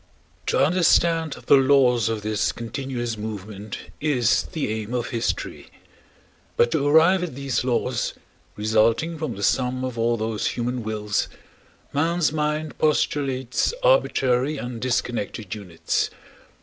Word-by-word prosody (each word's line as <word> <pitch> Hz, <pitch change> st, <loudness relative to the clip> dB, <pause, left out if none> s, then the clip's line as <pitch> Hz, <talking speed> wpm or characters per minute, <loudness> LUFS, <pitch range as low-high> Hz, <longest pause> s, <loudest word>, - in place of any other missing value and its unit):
To -, -, +1 dB
understand 165 Hz, -2 st, +3 dB
the 140 Hz, -, +7 dB
laws 130 Hz, -4 st, +4 dB
of 110 Hz, -2 st, -3 dB
this 105 Hz, -1 st, 0 dB
continuous 120 Hz, 0 st, -4 dB
movement 105 Hz, -1 st, -6 dB, 0.2 s
is 130 Hz, -7 st, +2 dB
the 155 Hz, -8 st, -2 dB
aim 110 Hz, +2 st, -4 dB
of 120 Hz, -1 st, -2 dB
history. 115 Hz, -1 st, -3 dB, 0.9 s
But 120 Hz, -, +4 dB
to 145 Hz, -2 st, +1 dB
arrive 165 Hz, +5 st, +5 dB
at 175 Hz, -7 st, -4 dB
these 135 Hz, -2 st, -1 dB
laws, 125 Hz, -1 st, -1 dB, 0.4 s
resulting 115 Hz, +9 st, +1 dB
from 150 Hz, -8 st, -3 dB
the 100 Hz, -, -6 dB
sum 130 Hz, +2 st, +1 dB
of 125 Hz, -2 st, -5 dB
all 115 Hz, +1 st, +2 dB
those 110 Hz, -1 st, -2 dB
human 125 Hz, +1 st, -2 dB
wills, 105 Hz, -1 st, -1 dB, 0.7 s
man's 165 Hz, +2 st, +1 dB
mind 150 Hz, 0 st, -2 dB
postulates 135 Hz, -, +1 dB
arbitrary 145 Hz, -, +2 dB
and 120 Hz, -3 st, -6 dB
disconnected 120 Hz, -5 st, -2 dB
units. 90 Hz, -6 st, -2 dB
125 Hz, 125 wpm, -24 LUFS, 110-150 Hz, 0.9 s, the